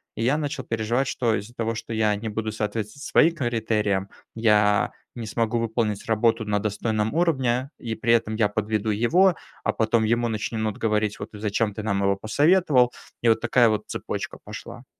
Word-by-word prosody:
И 115 - -2
я 135 +5 +2
начал 145 -3 -3
переживать, 115 +4 -1
что 115 -4 0
из-за 105 +3 -6
того, 115 -1 -2
что 115 +1 -7
я 110 -2 +2
не 110 +2 -4
буду 110 +1 -3
соответствовать 110 +4 -4
своим 165 0 +4
критериям, 110 -7 0 0.3
я 105 -2 +3 0.2
не 115 - -5
смогу 115 +1 -1
выполнить 110 -2 -1
работу 115 0 +1
на 105 -1 0
достойном 105 +1 -1
уровне, 135 -7 +1
и 115 -2 -4
при 115 +2 +2
этом 110 -2 +1
я 110 -1 +3
подведу 110 0 -1
его, 165 - +3 0.3
а - - +1
потом 110 0 +2
ему 120 +2 +1
начнут 110 0 -2
говорить: 105 -1 0
"Вот 100 - -6
зачем 105 0 -1
ты 110 - -5
нам 100 -2 0
его 100 0 +3
посоветовал?" 135 - +3 0.3
И - - +3
вот 110 0 +3
такая 120 0 +4
вот 110 -1 0
цепочка - - -5
пошла. - - -9
110 Hz, 180 wpm, -24 LUFS, 105-120 Hz, 0.3 s, своим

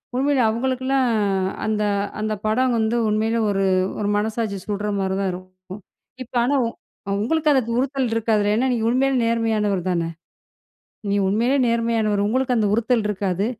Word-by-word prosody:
உண்மையிலே 275 +1 +2
அவுங்களுக்ல்லாம், 260 +3 0 0.6
அந்த 215 -1 0 0.4
அந்த 215 0 -1
படம் 245 +3 +2
வந்து 220 +1 0
உண்மையிலே, 220 +2 0
ஒரு 195 -1 +1 0.3
ஒரு 205 - -1
மனசாட்சி 215 -1 -2
சுட்ற 205 0 -2
மாரி 190 0 -1
தான் 195 -1 0
இருக்கும். 185 +2 -11 0.4
இப்ப 240 - -22
ஆனா, 270 +4 +1
உ - - -2 0.5
உங்களுக்கு 305 +6 +1
அந்த 265 - +3 0.2
உறுத்தல் 265 -2 0
இருக்காதுல. 215 -2 +1
ஏன்னா, 250 +4 +1
நீங்க 225 -2 -1
உண்மையிலே 265 +2 +2
நேர்மையானவர் 215 -5 0
தானே? 170 -2 -1 1.0
நீ 200 - +1
உண்மையிலேயே 240 +7 +2
நேர்மையானவர். 225 -3 +1
உங்களுக்கு 255 +2 +1
அந்த 215 -2 +2
உறுத்தல் 230 0 +1
இருக்காது. 195 -1 -1
220 Hz, 145 wpm, -22 LUFS, 205-250 Hz, 1.0 s, அந்த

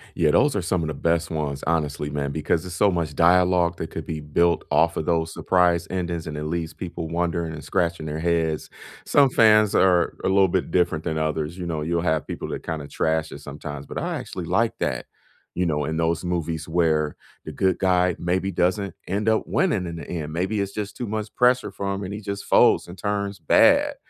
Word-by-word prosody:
Yeah, 75 -2 +3
those 145 - +3
are 105 - 0
some 90 0 0
of 80 - -2
the 75 - -3
best 85 +1 0
ones, 75 -3 -3
honestly, 75 -3 -1
man, 70 -1 -2
because 80 +2 0
there's 90 -1 -7
so 100 +1 +3
much 85 -4 -2
dialogue 90 0 +3
that 80 - -5
could 80 - -6
be 80 -1 -4
built 85 +4 +1
off 85 +1 +3
of 80 - -2
those 80 -1 0
surprise 90 -2 +2
endings, 85 -3 -3
and 75 -1 -5
it 75 - -4
leaves 80 0 -3
people 85 -1 -6
wondering 85 0 -2
and 75 -2 -8
scratching 85 0 -1
their 75 0 -4
heads. 80 -2 0 0.4
Some 140 -2 +4
fans 110 -3 +5
are 90 -2 +3
a - - +1
little 95 0 +4
bit 90 -1 -1
different 85 -3 +1
than 80 -1 -2
others, 80 +1 -2
you 90 - -5
know? 80 -3 -3
You'll 85 +2 -1
have 80 -3 0
people - - -5
that - - -5
kinda 80 -3 -4
trash 80 +1 -1
it - - -8
sometimes, 75 0 -7
but - - -8
I - - -2
actually - - -6
like - - +1
that, - - -2 0.5
you 90 - 0
know, 75 -3 0
in 80 +2 -2
those 85 +1 0
movies 85 -3 -2
where 80 -3 +1 0.3
the - - -5
good 95 -1 +1
guy 90 -2 +2
maybe 95 +3 -1
doesn't 95 +3 0
end 100 +4 0
up 110 - +2
winning 150 - +1
in 85 -1 -5
the 75 - -8
end, 80 -3 -4
maybe 95 +5 -1
it's 100 0 -4
just 105 -2 -5
too 120 - -4
much 110 0 -4
pressure 125 +1 +3
for 100 0 -3
him 100 +1 -4
and 95 +1 -5
he 105 - -6
just 100 -1 -5
folds - - +4
and 90 +2 -10
turns 100 -1 -2
bad, 285 0 +4
85 Hz, 220 wpm, -24 LUFS, 80-95 Hz, 0.5 s, fans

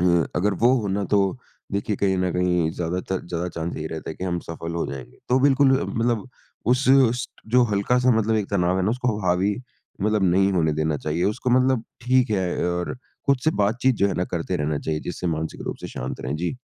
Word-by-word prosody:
अ, 85 -3 +3
अगर 100 +2 +1
वो 125 - +6
होना, 100 0 -1
तो 100 +3 +1 0.3
देखिए 100 +1 -1
कहीं 95 -1 +1
न 90 0 +1
कहीं 90 -2 +1
ज़्यादातर 90 +2 -2
ज़्यादा 85 0 -3
चांस 85 0 -4
यही 80 - -4
रहता 80 0 -6
है - - -6
कि 95 - -5
हम 90 -1 -1
सफल 85 0 -5
हो 85 - -1
जाएँगे। 65 -3 -8
तो 125 - +5
बिल्कुल 135 -1 +5
अ, - - -1
मतलब 115 0 -1 0.4
उस, 125 +2 +2
उस 130 -2 +4
ट - - -22
जो 125 0 +6
हल्का-सा 125 +5 +2
मतलब 110 0 +1
एक 105 -2 -1
तनाव 90 -2 +2
है - - +1
ना, 105 - +2
उसको 125 -2 -1
ह 95 - -4
हावी 90 +3 +2 0.5
मतलब 105 -1 +2
नहीं 95 +2 +3
होने 80 -4 +2
देना 80 0 0
चाहिए। 75 +4 -2
उसको 125 +4 0
मतलब 130 -2 +2 0.2
ठीक 130 -1 +3
है 95 -3 0
और 90 0 -2 0.3
खुद 140 -1 +4
से 155 - +4
बातचीत 125 +5 +2
जो 100 - +5
है 95 - -2
ना, 90 - 0
करते 90 +1 -2
रहना 75 -1 -1
चाहिए, 75 0 -2
जिससे 90 0 -5
मानसिक 80 +1 -5
रूप - - -3
से - - -6
शांत - - -4
रहें। 70 +4 -3
जी। 90 - -2
95 Hz, 225 wpm, -24 LUFS, 85-120 Hz, 0.5 s, वो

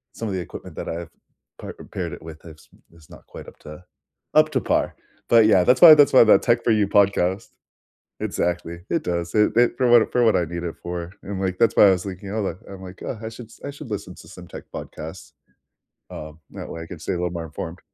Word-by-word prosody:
some 115 - -5
of 100 - -3
the 95 - -2
equipment - - -10
that - - -5
I've 85 0 -6 0.5
pa - - -9
uh, - - -10
paired - - -4
it - - -10
with 80 -1 -11
is 80 -2 -14 0.3
is 80 -2 -19
not - - -15
quite - - -11
up - - -14
to 75 +3 -12 0.5
up 155 0 +5
to 130 - +1
par, - - 0 0.3
but, 115 -2 +6
yeah, 95 -4 +5
that's 125 +6 +3
why 165 -3 +11
that's 145 -1 +5
why 130 - +8
that 110 - +5
Tech 120 0 +1
for 115 - +2
You 105 -2 +2
podcast 100 0 +1 0.7
exactly. 85 0 -3
It 165 - 0
does, 85 +1 -3
it 105 +1 +2
it 120 0 +4
for 125 - +2
what 120 -2 +5
for 125 - +2
what 110 - +4
I 90 - +1
need 85 +1 -6
it 85 - -5
for, 85 0 -5
and, 95 -1 -6
like, 95 -1 -2
that's 115 - +3
why - - +8
I - - +6
was 90 0 0
thinking, 95 0 -7
"Oh, 110 +1 -2
like" 90 -3 -4
I'm 95 -1 -10
like, 90 0 -11
"Oh, 115 - -5
I - - -3
should 115 0 -11
I 140 - -4
should 140 -4 -11
listen 95 -3 -5
to - - -15
some 90 -1 -12
tech - - -10
podcasts." 80 +4 -9 0.8
Um, 75 +1 -9
that - - -8
way, 80 - -7
I 80 - -11
could 85 -2 -10
stay - - -3
a - - -2
little 90 0 -2
more 85 -1 -5
informed. 80 +3 -7
95 Hz, 250 wpm, -22 LUFS, 85-110 Hz, 0.8 s, why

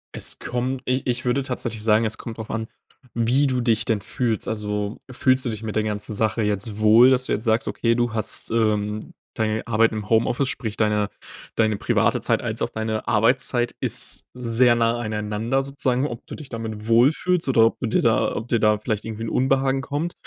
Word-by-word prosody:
Es - - +2
kommt 125 +2 -3
ich 130 +1 -1
ich 120 0 -1
würde 125 +3 +1
tatsächlich 120 -4 -4
sagen, 110 +1 +3
es 110 0 -2
kommt 115 -1 -8
drauf 110 - -7
an, 110 0 -3 0.5
wie 120 +5 +2
du 130 -1 0
dich 115 -2 +2
denn 110 -3 0
fühlst. 115 +2 -2
Also, 105 -1 -3
fühlst 130 +1 +2
du 120 - 0
dich 110 -1 -5
mit 110 -2 -5
der 110 - +1
ganzen 105 0 -2
Sache 110 +2 0
jetzt 105 0 -1
wohl, 110 +4 +7
dass 130 0 +2
du - - -1
jetzt 105 - -2
sagst: 115 0 +1
Okay, 115 -1 +1
du 120 -1 0
hast, 110 -1 0
ähm 105 -2 -1 0.2
deine 110 0 -1
Arbeit 115 0 +3
im 105 -2 -5
Homeoffice, 120 +4 +2
sprich 110 -4 -4
deine 105 -1 +1 0.5
deine 110 -1 +2
private - - +1
Zeit - - +1
als - - -4
auch - - 0
deine 110 0 -3
Arbeitszeit 120 +2 +1
ist - - +2
sehr 120 0 +3
nah 115 0 +1
aneinander, 110 +4 -1
sozusagen. 135 -1 -1
Ob 120 -2 -8
du - - -7
dich 150 - -9
damit 110 -3 -6
wohlfühlst 140 +8 +3
oder 115 -3 +5
ob 115 - 0
du 120 - -1
dir - - +2
da - - +2
ob 110 - -5
dir 120 -2 +1
da 105 0 +4
vielleicht 105 0 -3
irgendwie 115 0 -6
'n - - -3
Unbehagen 135 +1 +1
kommt, 150 +6 -3
115 Hz, 205 wpm, -23 LUFS, 110-125 Hz, 0.5 s, wohl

